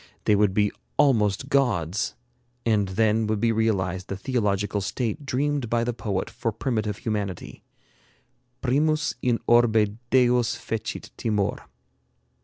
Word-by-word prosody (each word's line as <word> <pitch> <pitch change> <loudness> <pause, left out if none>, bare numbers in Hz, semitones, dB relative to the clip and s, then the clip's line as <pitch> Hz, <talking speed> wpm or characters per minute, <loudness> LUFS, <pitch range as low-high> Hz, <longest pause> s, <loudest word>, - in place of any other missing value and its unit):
They 105 - +4
would 100 -2 +2
be 105 -1 +3 0.3
almost 120 -4 +3
gods, 105 - +1 0.5
and 105 -3 +2
then 110 +3 +1
would 110 -1 0
be 115 +2 +2
realized 95 -5 0
the 100 - -4
theological 105 -3 0
state 120 +7 -3
dreamed 140 -1 0
by 115 0 +1
the 120 +1 -1
poet 100 -5 -2
for 115 - -3
primitive 110 -3 -2
humanity: 105 -5 -4 1.0
'Primus 155 +4 +1
in 120 -2 +2
orbe 110 -3 +3
Deos 125 -2 +3
fecit 110 -1 -5
timor.'" 105 -3 -1
110 Hz, 125 wpm, -25 LUFS, 100-120 Hz, 1.0 s, They